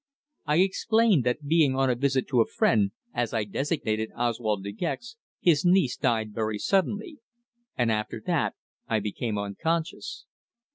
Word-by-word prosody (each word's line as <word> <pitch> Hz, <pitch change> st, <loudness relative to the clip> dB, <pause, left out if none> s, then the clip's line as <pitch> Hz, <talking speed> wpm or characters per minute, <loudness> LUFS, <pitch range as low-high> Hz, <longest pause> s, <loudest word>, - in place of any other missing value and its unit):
I 150 Hz, +1 st, +3 dB
explained 200 Hz, -, +3 dB
that 125 Hz, +4 st, -1 dB
being 150 Hz, -3 st, +3 dB
on 135 Hz, -1 st, +2 dB
a -, -, +1 dB
visit 135 Hz, +1 st, 0 dB
to 125 Hz, -4 st, +4 dB
a -, -, +2 dB
friend 105 Hz, -3 st, +2 dB, 0.2 s
as 120 Hz, -1 st, -1 dB
I 110 Hz, -, +1 dB
designated 110 Hz, -1 st, -2 dB
Oswald 115 Hz, -4 st, -1 dB
De 100 Hz, -, -4 dB
Gex 240 Hz, -, -4 dB, 0.2 s
his 165 Hz, -5 st, +3 dB
niece 180 Hz, -8 st, +3 dB
died 110 Hz, -2 st, 0 dB
very 110 Hz, -1 st, -1 dB
suddenly. 205 Hz, -, 0 dB, 0.6 s
And 120 Hz, -2 st, +2 dB
after 105 Hz, -1 st, -2 dB
that -, -, 0 dB, 0.3 s
I 110 Hz, -, +1 dB
became 105 Hz, +1 st, -3 dB
unconscious. 120 Hz, +3 st, -3 dB
125 Hz, 150 wpm, -27 LUFS, 110-165 Hz, 0.6 s, to